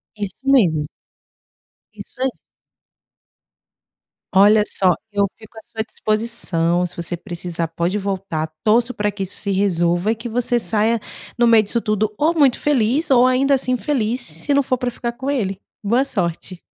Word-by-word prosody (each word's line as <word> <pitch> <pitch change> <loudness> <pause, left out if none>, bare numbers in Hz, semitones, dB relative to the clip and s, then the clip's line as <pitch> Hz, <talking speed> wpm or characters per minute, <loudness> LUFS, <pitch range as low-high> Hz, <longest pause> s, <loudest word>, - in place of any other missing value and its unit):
Isso 205 -3 -5
mesmo. 195 - +3 1.1
Isso - - -12
aí. 260 -1 +1 2.0
Olha 210 +2 +6
só, 185 -3 +2 0.2
eu 200 -1 +2
fico 220 0 -16
à - - -14
sua 220 -1 -5
disposição, 215 -7 -1
se 180 - -10
você 170 +1 -4
precisar 175 -1 -4
pode 170 +5 -2
voltar. 190 -5 -3
Torço 230 +3 +3
pra 210 -3 -1
que 200 0 -8
isso 190 - -3
se 200 -1 -2
resolva, 180 0 +1
e - - 0
que 230 +2 -7
você 240 +1 0
saia 225 +1 +1 0.4
no 240 - +4
meio 230 -2 +6
disso 215 +3 -1
tudo 215 -1 0
ou 315 +3 +2
muito 285 -6 +3
feliz, 280 +2 +1
ou 250 -1 +6
ainda 265 +2 +2
assim 255 -1 +1
feliz, 245 -3 -1
se 165 - -2
não 280 - +3
for 255 -1 0
pra 250 -1 -1
ficar 240 0 -4
com 260 +3 -5
ele, 200 -8 -2 0.2
boa 235 +6 +2
sorte. 180 -6 -3
215 Hz, 165 wpm, -20 LUFS, 185-245 Hz, 2.0 s, Olha